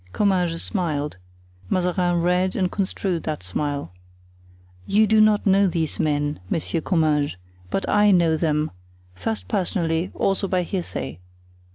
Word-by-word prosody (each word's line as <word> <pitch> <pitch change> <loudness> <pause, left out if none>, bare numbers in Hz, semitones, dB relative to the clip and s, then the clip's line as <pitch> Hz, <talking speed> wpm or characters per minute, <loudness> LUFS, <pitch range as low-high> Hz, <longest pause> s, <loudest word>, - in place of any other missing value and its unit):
Comminges 180 -5 +1
smiled; 150 - -2 0.5
Mazarin 180 -1 +1
read 180 +1 +1
and 185 -3 0
construed 190 -3 -1
that 155 -11 -4
smile. 140 - -3 0.9
"You 215 +2 +4
do 215 0 +4
not 215 -1 +4
know 195 0 +4
these 165 -3 -2
men, 145 -1 0
Monsieur 165 +1 -1
Comminges, 155 - +1 0.3
but 195 - -2
I 210 0 +4
know 170 -4 +4
them, 155 -1 0 0.4
first 90 +1 -4
personally, 170 - 0
also 195 0 0
by 185 -1 +1
hearsay. 90 - -4
175 Hz, 130 wpm, -23 LUFS, 150-190 Hz, 0.9 s, You